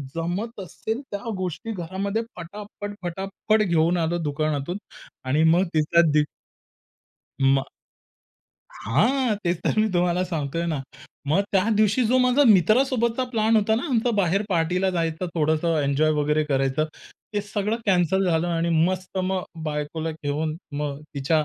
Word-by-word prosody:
जमत 190 +7 -3
असेल, 220 - -4
त्या 200 +3 -4
गोष्टी 185 +4 -4
घरामध्ये 195 +4 -2
पटापट, 205 +3 -8
पटापट 195 +4 -1
घेऊन 170 -1 +2
आलो 170 +1 0
दुकानातून 155 +3 -1 0.5
आणि 145 +5 +2
मग 170 +3 +5
तिचा 155 +2 +4
दी 150 0 +4 1.2
मग 135 0 +3 1.1
हां, 225 - +1
तेच 170 -1 +1
तर - - +1
मी 215 0 +3
तुम्हाला 180 +1 +2
सांगतोय 165 -1 -2
ना. 155 -5 -1 0.5
मग 190 +7 +3
त्या 190 -1 +3
दिवशी 215 +3 +3
जो 255 +3 +3
माझा 250 +3 +4
मित्रासोबतचा 235 - +3
प्लॅन 220 0 +3
होता 220 +1 +3
ना, 235 - -1
आमचा 240 -1 +1
बाहेर 195 +1 +2
पार्टीला 180 +2 +1
जायचं, 165 0 -1
थोडंसं 160 +1 +1
एन्जॉय 140 +3 +2
वगैरे 150 +1 +1
करायचं, 135 +1 +1 0.5
ते 205 - +1
सगळं 205 +2 -2
कॅन्सल 190 0 +3
झालं 170 +1 +1
आणि 170 0 0 0.2
मस्त 185 0 -3
मग 190 0 -1 0.2
बायकोला 155 +1 -3
घेऊन, 155 0 -3 0.2
मग 145 0 -3
तिच्या 150 +3 +1
175 Hz, 140 wpm, -24 LUFS, 155-205 Hz, 1.2 s, मग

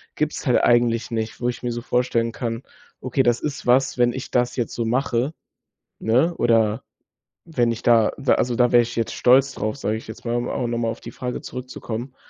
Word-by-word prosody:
gibt's - - -2
halt - - +4
eigentlich 120 0 +2
nicht. 110 0 -3
Wo 120 - +1
ich 120 - -6
mir 120 - -1
so 120 0 -4
vorstellen 120 -2 0
kann: 115 +1 -4 0.4
„Okay, 130 +1 +1
das 120 -1 +2
ist 145 -2 -4
was, 130 +2 +3
wenn 120 -1 +3
ich 130 +1 -7
das 125 0 +1
jetzt 120 -3 -2
so 115 - -1
mache, 125 +3 0 0.7
ne, 130 +10 +2
oder 115 -2 +2 0.6
wenn 125 -8 +1
ich 115 - -5
da 115 -3 +4
w 140 - +2
also, 120 -1 0
da 125 0 +3
wäre 120 -1 +7
ich 115 - -7
jetzt 115 -1 -1
stolz 130 +2 +4
drauf, 110 +3 -3
sage 110 -4 -1
ich 110 - -11
jetzt 110 - -10
mal, 120 0 -1
um 120 0 -1
a - - -3
um - - -2
auch - - -1
nochmal 115 -1 -1
auf - - -9
die 115 - -8
Frage 125 +1 -5
zurückzukommen. 125 0 -6
120 Hz, 225 wpm, -22 LUFS, 115-125 Hz, 0.7 s, wäre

